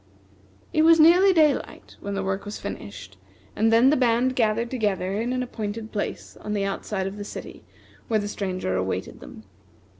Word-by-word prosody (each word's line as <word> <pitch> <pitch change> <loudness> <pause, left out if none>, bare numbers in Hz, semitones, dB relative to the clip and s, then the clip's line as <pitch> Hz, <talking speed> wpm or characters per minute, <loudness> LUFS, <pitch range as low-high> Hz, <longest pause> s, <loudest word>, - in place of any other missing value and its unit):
It 310 - +3
was 325 +1 +6
nearly 355 +5 +7
daylight 310 -5 +1
when 200 0 -4
the 195 - -2
work 190 0 -2
was 205 +1 -6
finished; 100 - -8 0.4
and 225 +1 +2
then 235 +4 +6
the - - +4
band 250 0 +2
gathered 230 0 +1
together 205 -4 -1
in 240 +2 -2
an 255 0 -1
appointed 220 -2 -5
place 205 - -4
on 210 - -5
the 200 -1 0
outside 195 0 -3
of 195 +2 -5
the 205 - -5
city, - - -9 0.4
where 220 -2 +1
the 205 - -3
Stranger 185 - -3
awaited 95 0 -3
them. - - -12
215 Hz, 180 wpm, -24 LUFS, 195-250 Hz, 0.4 s, nearly